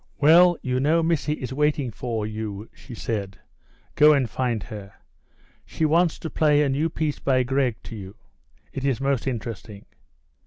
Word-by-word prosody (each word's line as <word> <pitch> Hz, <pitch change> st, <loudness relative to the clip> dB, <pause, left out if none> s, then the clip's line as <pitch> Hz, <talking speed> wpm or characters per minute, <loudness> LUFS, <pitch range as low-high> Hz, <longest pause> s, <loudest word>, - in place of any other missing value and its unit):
"Well, 170 Hz, +4 st, +6 dB
you 125 Hz, 0 st, -1 dB
know 160 Hz, +5 st, +2 dB
Missy 160 Hz, -2 st, 0 dB
is 130 Hz, -4 st, -6 dB
waiting 150 Hz, -2 st, 0 dB
for 115 Hz, -1 st, -3 dB
you," 105 Hz, -1 st, -5 dB
she 125 Hz, -, -12 dB
said. 100 Hz, -4 st, -4 dB, 0.6 s
"Go 150 Hz, +1 st, +6 dB
and 135 Hz, -4 st, +1 dB
find 120 Hz, -1 st, -2 dB
her. 100 Hz, -3 st, -9 dB, 0.7 s
She 160 Hz, -, -2 dB
wants 165 Hz, +2 st, +2 dB
to 160 Hz, -, -6 dB
play 150 Hz, -1 st, +3 dB
a 140 Hz, -, +1 dB
new 145 Hz, +5 st, 0 dB
piece 155 Hz, -2 st, -2 dB
by 130 Hz, -2 st, +2 dB
Grieg 130 Hz, -2 st, 0 dB
to 115 Hz, -, -9 dB
you; 100 Hz, -1 st, -9 dB, 0.6 s
it 135 Hz, -, -5 dB
is 135 Hz, -3 st, 0 dB
most 135 Hz, -2 st, -1 dB
interesting." 110 Hz, -4 st, -6 dB
130 Hz, 165 wpm, -24 LUFS, 115-150 Hz, 0.7 s, Well